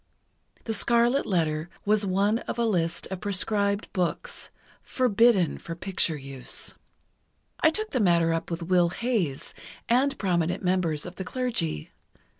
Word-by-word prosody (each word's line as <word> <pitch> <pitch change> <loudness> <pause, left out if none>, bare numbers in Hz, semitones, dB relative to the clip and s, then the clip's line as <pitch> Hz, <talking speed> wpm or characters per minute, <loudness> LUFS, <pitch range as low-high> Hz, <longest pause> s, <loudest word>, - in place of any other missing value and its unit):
'The 225 - -2
Scarlet 235 +5 +3
Letter' 160 -3 0 0.2
was 210 0 +2
one 200 +4 +2
of - - -3
a 235 - +1
list 170 -6 0
of 185 -2 -4
proscribed 200 0 0
books—forbidden 225 - 0
for 165 - -7
picture 180 -3 -1
use. 135 -2 -5 0.9
I 315 - +5
took 430 +6 -2
the 255 - 0
matter 170 -5 +3
up 165 0 -3
with 170 0 -3
Will 175 0 +3
Hays, 195 - -2 0.3
and 270 +4 +2
prominent 175 -3 0
members 180 -5 0
of 180 0 -9
the 190 - -3
Clergy. 185 - -2
190 Hz, 135 wpm, -26 LUFS, 170-230 Hz, 0.9 s, I